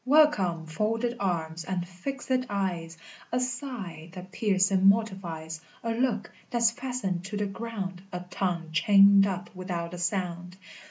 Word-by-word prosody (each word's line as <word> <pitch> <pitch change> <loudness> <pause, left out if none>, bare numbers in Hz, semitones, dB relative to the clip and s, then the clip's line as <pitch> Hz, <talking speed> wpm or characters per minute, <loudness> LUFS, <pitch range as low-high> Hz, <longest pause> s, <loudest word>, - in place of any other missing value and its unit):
Welcome, 245 - +4
folded 225 +8 -1
arms, 170 -4 -1
and 185 -1 -2
fixèd 255 +8 -3
eyes, 175 -5 -2 0.3
A 250 - +1
sigh 245 - -4
that 185 0 -9
piercing 195 -3 +2
mortifies, 175 -7 -1 0.2
A 230 - -1
look 230 -3 0 0.2
that's 235 -1 +3
fastened 235 -8 -3
to 205 +2 -4
the 205 - 0
ground, 195 -3 -5
A 180 -1 -4
tongue 170 -4 -1
chained 200 +3 +7
up 185 -1 -4
without 180 -2 -4
a 180 - -6
sound! 180 0 -2
190 Hz, 140 wpm, -28 LUFS, 175-225 Hz, 0.3 s, chained